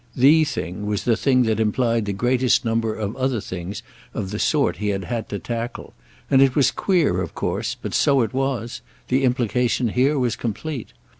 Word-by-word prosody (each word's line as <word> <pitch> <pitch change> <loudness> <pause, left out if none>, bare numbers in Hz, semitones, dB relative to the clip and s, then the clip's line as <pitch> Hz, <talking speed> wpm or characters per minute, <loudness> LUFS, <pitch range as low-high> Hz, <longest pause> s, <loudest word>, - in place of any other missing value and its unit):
"The" 150 +5 +6
thing 105 - -4
was 105 -1 -1
the 115 - +2
thing 130 +1 +3
that 110 -2 0
implied 115 +1 +1
the 100 - -2
greatest 125 +5 +1
number 115 -1 0
of 105 +1 -4
other 130 -2 0
things 90 +1 -6 0.3
of 95 - -3
the 105 - -4
sort 150 -3 +1
he 105 - -3
had 100 -2 -1
had 115 +4 -4
to 100 - -3
tackle; 115 +2 -5 0.3
and 135 -1 +4
it 135 -2 +4
was 140 - +4
queer 180 -6 +1
of - - -6
course, - - -2
but - - -6
so 140 -2 +3
it 110 -3 -2
was—the 130 0 -2
implication 125 -2 +1
here 135 +6 +2
was 125 -3 0
complete. 120 +4 -5
120 Hz, 190 wpm, -22 LUFS, 105-130 Hz, 0.3 s, The